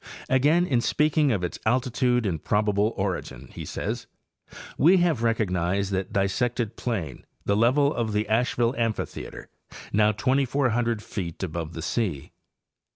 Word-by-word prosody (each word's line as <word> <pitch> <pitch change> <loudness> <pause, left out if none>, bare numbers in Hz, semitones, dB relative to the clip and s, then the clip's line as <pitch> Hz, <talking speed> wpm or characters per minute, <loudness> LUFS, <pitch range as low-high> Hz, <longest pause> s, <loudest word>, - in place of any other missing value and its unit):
Again, 150 +7 +4
in 125 -8 +1
speaking 150 +1 +2
of 100 -6 -1
its 90 - -4
altitude 125 0 +1
and 85 -6 -2
probable 105 0 +1
origin, 85 -10 -3
he - - -7
says: - - -4 0.4
* - - -58 0.3
We 175 +7 +6
have 170 -8 +2
recognized 100 -4 0
that 95 -1 -2
dissected 110 +3 0
plain, 90 - -4 0.2
the 100 - +2
level 135 +7 +3
of 115 -2 -2
the 105 +1 0
Asheville 120 +1 +1
amphitheater, 115 -2 -3 0.5
now 105 +1 +4
2,400 120 -1 +1
feet 85 -2 -5
above 85 -2 -4
the 80 - -6
sea. 90 - -2
110 Hz, 140 wpm, -25 LUFS, 95-125 Hz, 0.5 s, We